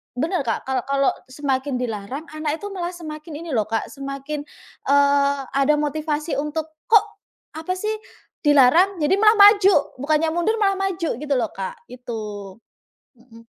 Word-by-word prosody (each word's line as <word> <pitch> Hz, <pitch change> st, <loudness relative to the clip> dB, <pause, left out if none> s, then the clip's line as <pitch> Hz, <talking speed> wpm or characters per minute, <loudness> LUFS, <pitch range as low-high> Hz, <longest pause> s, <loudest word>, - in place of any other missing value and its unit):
Benar 320 Hz, +7 st, -1 dB
Kak, 225 Hz, -, -1 dB
kal 265 Hz, -1 st, 0 dB
kalau 275 Hz, -1 st, +2 dB, 0.2 s
semakin 270 Hz, 0 st, -2 dB
dilarang 240 Hz, +3 st, -4 dB
anak 310 Hz, 0 st, -2 dB
itu 410 Hz, 0 st, -6 dB
malah 355 Hz, -2 st, -4 dB
semakin 310 Hz, -2 st, -8 dB
ini 330 Hz, -, -6 dB
loh 220 Hz, -5 st, 0 dB
Kak, 225 Hz, +1 st, -3 dB
semakin, 275 Hz, +1 st, -5 dB, 0.5 s
eee, 280 Hz, 0 st, +3 dB
ada 275 Hz, +2 st, +3 dB
motivasi 300 Hz, +1 st, -2 dB
untuk, 300 Hz, +2 st, -3 dB, 0.2 s
"Kok? 435 Hz, -2 st, +6 dB, 0.6 s
Apa 365 Hz, +3 st, -2 dB
sih?" 425 Hz, +3 st, -2 dB, 0.5 s
Dilarang 295 Hz, +7 st, +5 dB
jadi 300 Hz, +6 st, +3 dB
malah 430 Hz, +1 st, +6 dB
maju, 400 Hz, -8 st, +6 dB
bukannya 310 Hz, +3 st, +1 dB
mundur 345 Hz, +6 st, +1 dB
malah 390 Hz, -1 st, +2 dB
maju 375 Hz, -4 st, -1 dB
gitu 290 Hz, +1 st, -2 dB
loh 230 Hz, -5 st, 0 dB
Kak, 190 Hz, -1 st, -6 dB
gitu. 215 Hz, -6 st, -7 dB, 0.6 s
Mhm. 230 Hz, -1 st, -17 dB
295 Hz, 150 wpm, -22 LUFS, 260-335 Hz, 0.6 s, Kok